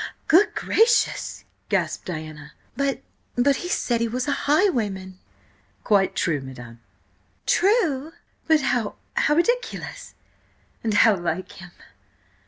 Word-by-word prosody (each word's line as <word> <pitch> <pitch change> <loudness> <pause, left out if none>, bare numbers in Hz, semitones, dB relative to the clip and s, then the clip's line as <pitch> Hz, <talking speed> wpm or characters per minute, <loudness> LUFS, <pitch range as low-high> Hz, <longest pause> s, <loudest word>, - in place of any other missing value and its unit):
"Good–gracious!" 435 +6 +2 0.2
gasped - - -1
Diana. 155 -3 -7 0.2
"B 275 +1 -1 0.3
but 270 +3 +3
he 355 - -5
said 235 -9 0
he 230 - +1
was 250 +3 -3
a - - +1 0.2
highwayman!" 210 - +1 0.6
"Quite 200 -3 +2
true, 155 -5 0
madam." 120 -3 -10 0.7
"True? 335 - +2 0.4
But 315 -2 +4
how–how 250 +3 -1
ridiculous–and 475 - -4
how 220 0 +6
like 175 0 -3
him!" 180 -1 -12
240 Hz, 100 wpm, -23 LUFS, -, 0.7 s, how